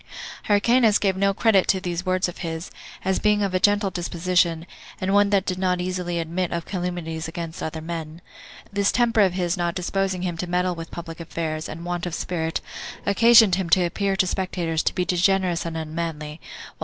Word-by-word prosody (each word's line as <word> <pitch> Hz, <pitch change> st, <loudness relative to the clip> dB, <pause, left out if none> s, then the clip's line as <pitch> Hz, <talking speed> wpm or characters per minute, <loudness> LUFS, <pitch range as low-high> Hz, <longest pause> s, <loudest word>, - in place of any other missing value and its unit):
Hyrcanus 220 Hz, +1 st, +4 dB
gave 195 Hz, -2 st, +1 dB
no 195 Hz, +1 st, +2 dB
credit 200 Hz, -1 st, +3 dB
to 190 Hz, -, +3 dB
these 180 Hz, -1 st, -4 dB
words 185 Hz, 0 st, +2 dB
of 175 Hz, -, -8 dB
his, 165 Hz, -1 st, -5 dB, 0.3 s
as 190 Hz, 0 st, +1 dB
being 210 Hz, -1 st, +2 dB
of 195 Hz, -2 st, -1 dB
a 185 Hz, -, +2 dB
gentle 205 Hz, 0 st, +3 dB
disposition, 175 Hz, -1 st, 0 dB, 0.3 s
and 190 Hz, +1 st, 0 dB
one 205 Hz, 0 st, +5 dB
that 200 Hz, -1 st, +2 dB
did 185 Hz, 0 st, -2 dB
not 180 Hz, -1 st, +1 dB
easily 180 Hz, -1 st, -2 dB
admit 170 Hz, +2 st, -2 dB
of 170 Hz, -1 st, -3 dB
calumnies 175 Hz, -3 st, -4 dB
against 165 Hz, 0 st, -6 dB
other 160 Hz, 0 st, -4 dB
men. 160 Hz, -1 st, -6 dB, 0.5 s
This 200 Hz, 0 st, +2 dB
temper 230 Hz, -2 st, +3 dB
of 190 Hz, -3 st, +3 dB
his 180 Hz, 0 st, 0 dB
not 175 Hz, 0 st, -1 dB
disposing 190 Hz, 0 st, -1 dB
him 175 Hz, -2 st, -2 dB
to 180 Hz, -, -3 dB
meddle 180 Hz, +1 st, +1 dB
with 165 Hz, -1 st, -8 dB
public 165 Hz, -1 st, -8 dB
affairs, 160 Hz, -1 st, -4 dB
and 165 Hz, +2 st, -7 dB
want 175 Hz, 0 st, -2 dB
of 170 Hz, -, -3 dB
spirit, 165 Hz, -2 st, -2 dB, 0.4 s
occasioned 225 Hz, 0 st, +6 dB
him 185 Hz, -1 st, 0 dB
to 180 Hz, +3 st, +5 dB
appear 195 Hz, +3 st, 0 dB
to 190 Hz, -, +2 dB
spectators 175 Hz, -3 st, -1 dB
to -, -, -1 dB
be 180 Hz, -, 0 dB
degenerous 180 Hz, -2 st, +1 dB
and 165 Hz, -1 st, -4 dB
unmanly; 160 Hz, -1 st, -5 dB, 0.4 s
while. -, -, -38 dB
180 Hz, 195 wpm, -24 LUFS, 165-195 Hz, 0.5 s, occasioned